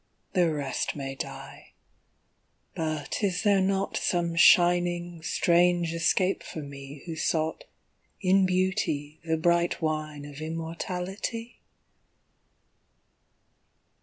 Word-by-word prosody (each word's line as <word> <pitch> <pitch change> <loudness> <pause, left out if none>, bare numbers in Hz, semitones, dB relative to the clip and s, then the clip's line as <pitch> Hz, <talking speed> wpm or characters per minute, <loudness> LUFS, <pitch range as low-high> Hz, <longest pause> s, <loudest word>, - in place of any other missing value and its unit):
The 175 -4 +3
rest 145 -3 -2
may 135 -2 -4
die 135 - -8 1.0
but 155 0 -3
is 195 0 0
there 200 -2 +4
not 195 +1 0
Some 170 -1 0
shining 175 0 +4
strange 175 0 +2
escape 175 +3 +1
for 155 - -7
me 140 0 -10
Who 165 -2 -5
sought 160 0 -1 0.5
in 190 0 +4
Beauty 180 -5 -1
the 160 -1 0
bright 170 +1 +2
wine 155 -2 -3
Of 145 +1 -9
immortality? 180 +8 -4
170 Hz, 100 wpm, -27 LUFS, 155-180 Hz, 1.0 s, there